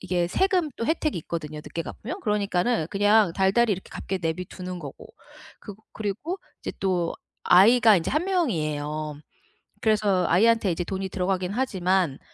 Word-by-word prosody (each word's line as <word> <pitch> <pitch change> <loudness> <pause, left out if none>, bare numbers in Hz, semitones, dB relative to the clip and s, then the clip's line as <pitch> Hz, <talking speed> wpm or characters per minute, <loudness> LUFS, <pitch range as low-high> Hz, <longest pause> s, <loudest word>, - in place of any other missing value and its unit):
이게 175 -1 0
세금 370 - +1
또 230 - -3
혜택이 315 0 0
있거든요? 155 -2 -5
늦게 165 +2 -5
갚으면. 265 - -7
그러니까는 205 - 0
그냥 205 -1 +4
달달이 200 +5 +3
이렇게 190 -1 -6
갚게 190 - -4
내버려 165 +2 -2
두는 180 -1 -6
거고. 145 -4 -9 0.5
그거 205 +1 -11
그리고 220 - -4 0.2
이제 - - -5
또 180 -3 0 0.3
아이가 220 +3 +6
이제 165 - -1
1 305 +4 0
명이에요. 155 - -2 0.6
그래서 210 -4 +2
아이한테 220 +2 +4
이제 175 +1 -2
돈이 190 +2 -4
들어가긴 185 -1 -1
하지만 190 - 0
190 Hz, 360 characters per minute, -25 LUFS, 175-225 Hz, 0.6 s, 아이가